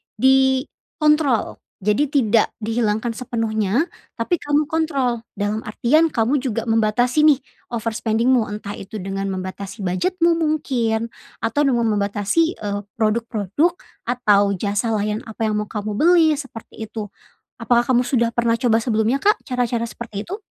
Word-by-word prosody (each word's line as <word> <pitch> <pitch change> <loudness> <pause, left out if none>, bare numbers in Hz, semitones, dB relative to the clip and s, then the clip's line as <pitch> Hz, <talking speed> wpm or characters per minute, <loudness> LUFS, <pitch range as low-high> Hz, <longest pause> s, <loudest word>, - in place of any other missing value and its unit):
dikontrol. 265 +2 +2 0.2
Jadi 210 +9 +1
tidak 230 -6 +3
dihilangkan 225 0 -1
sepenuhnya, 225 - -1 0.3
tapi 230 +10 +1
kamu 295 -2 0
kontrol. 280 -8 -1
Dalam 210 +1 -2
artian, 305 +9 +2
kamu 235 +3 +1
juga 240 -2 -2
membatasi 225 +5 +2
nih 300 -3 +6 0.3
overspending-mu. 230 0 0
Entah 205 -1 -6
itu 210 +2 -8
dengan 195 +1 -3
membatasi 190 +3 -6
budget-mu 335 - +1
mungkin 260 -8 0 0.3
atau 225 +6 0
dengan 240 -5 +2
membatasi, 205 - 0
eee, 205 -1 -3 0.2
produk-produk 225 - +1 0.3
atau 210 -5 +2
jasa 205 +4 -1
layan 210 0 -1
apa 225 0 -3
yang 215 - 0
mau - - -12
kamu 210 -1 -3
beli, 335 +5 +5
seperti 255 -6 -9
itu. 220 -1 -6 0.5
Apakah 240 0 +2
kamu 245 - +4
sudah 235 -2 +1
pernah 235 -1 +2
coba 230 -3 +3
sebelumnya, 230 +2 +1
Kak, 420 +6 +2
cara-cara 240 -3 -1
seperti 215 -3 -7
itu? 395 +4 -5
230 Hz, 135 wpm, -21 LUFS, 215-265 Hz, 0.5 s, nih